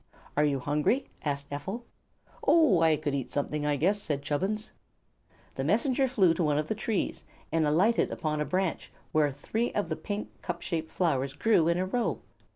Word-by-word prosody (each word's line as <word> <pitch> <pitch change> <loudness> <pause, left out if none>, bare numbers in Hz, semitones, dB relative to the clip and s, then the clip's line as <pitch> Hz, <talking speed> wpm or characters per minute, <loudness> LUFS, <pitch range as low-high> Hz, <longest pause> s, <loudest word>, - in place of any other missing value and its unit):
"Are 150 - +3
you 145 -2 +2
hungry?" 150 - +1 0.2
asked 140 -1 -3
Ephel. 190 +12 -4 0.6
"Oh, 280 - +5
I 160 -1 +5
could 150 -1 -2
eat 135 -3 -2
something, 150 +1 -2
I 145 - +2
guess," 195 +8 +1
said 145 -6 -2
Chubbins. 190 +9 -2 0.8
The 135 - -3
Messenger 245 - +2
flew 195 -9 +4
to 175 - -1
one 150 -2 +2
of 150 - 0
the 220 - -1
trees 215 -1 -2 0.3
and 160 -2 +2
alighted 190 +10 +3
upon 150 -2 -2
a - - 0
branch 185 -2 -1 0.2
where 150 -2 +3
three 220 - -2
of 205 -5 -1
the 160 - -1
pink, 205 +4 -6
cup 175 -1 -4
shaped 160 -3 -3
flowers 140 -6 0
grew 170 +1 +3
in 170 0 +2
a 185 - 0
row. 235 +5 -1
165 Hz, 185 wpm, -29 LUFS, 145-205 Hz, 0.8 s, Oh